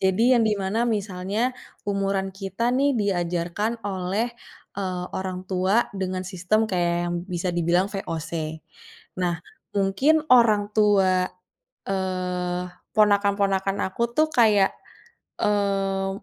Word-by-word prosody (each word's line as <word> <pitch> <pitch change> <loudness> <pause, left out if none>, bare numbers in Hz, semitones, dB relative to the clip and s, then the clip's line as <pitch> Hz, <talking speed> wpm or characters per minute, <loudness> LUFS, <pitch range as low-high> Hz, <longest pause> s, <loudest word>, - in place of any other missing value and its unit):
Jadi, 190 +4 +2
yang 235 -2 +4
di 215 - +2
mana 200 +5 0
misalnya, 205 +3 -1 0.3
umuran 195 -1 -1
kita, 195 +5 -2
nih, 275 +1 +2
diajarkan 190 +3 -1
oleh, 195 +4 -1 0.5
eee, 185 -2 -2
orang 185 -1 -4
tua 190 +5 +1
dengan 185 -1 -3
sistem 185 +4 0
kayak 175 -2 +1 0.2
yang - - -2
bisa 180 -1 -2
dibilang 175 +3 +1
VOC. 160 -4 -4 0.6
Nah, 175 -2 +1 0.4
mungkin 260 +12 +3
orang 215 -4 +5
tua, 195 -4 +3 0.6
eee, 180 -2 -2 0.3
ponakan-ponakan 200 -2 +2
aku, 190 +5 -4
tuh, 310 0 +4
kayak, 210 -6 +4 0.7
eee, 195 -2 +1
195 Hz, 110 wpm, -24 LUFS, 185-210 Hz, 0.7 s, orang